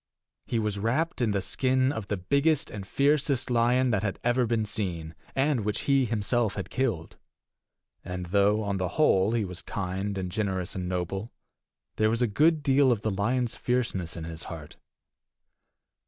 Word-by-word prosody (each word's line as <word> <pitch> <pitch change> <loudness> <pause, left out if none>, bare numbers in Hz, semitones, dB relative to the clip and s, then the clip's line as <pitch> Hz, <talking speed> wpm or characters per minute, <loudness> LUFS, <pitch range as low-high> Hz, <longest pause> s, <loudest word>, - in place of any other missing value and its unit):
He 115 - -1
was 105 -2 -1
wrapt 130 +9 0
in 120 - +2
the 100 -2 0
skin 130 +3 +1
of 110 -8 -5
the 105 - -1
biggest 140 - +1
and 100 -2 -7
fiercest 140 -1 +1
lion 125 +2 +3
that 100 -2 0
ever 120 +1 +2
had 120 - +2
been 115 -2 +1
seen, 90 -7 -3 0.2
and 135 -1 +2
which 105 -1 -2
he 135 -2 +3
himself 110 0 0
had - - -5
killed; 115 -12 -2 0.9
and 90 0 -5
though, 100 +4 +2
on 100 -1 -1
the 90 -2 -3
whole, 105 -9 +4
he 115 -3 +1
was 90 -1 -6
kind 95 0 -3
and 90 -1 -3
generous 95 -2 -2
and 90 -1 -4
noble, 95 +4 -3 0.7
there 110 0 +3
was 115 +2 +1
a - - +3
good 155 +8 +3
deal 135 -1 +4
of 115 -4 0
the 110 - -1
lion's 120 +5 0
fierceness 110 -10 -1
in 85 - -5
his 80 0 -6
heart. 80 -3 -8
110 Hz, 175 wpm, -27 LUFS, 95-125 Hz, 0.9 s, whole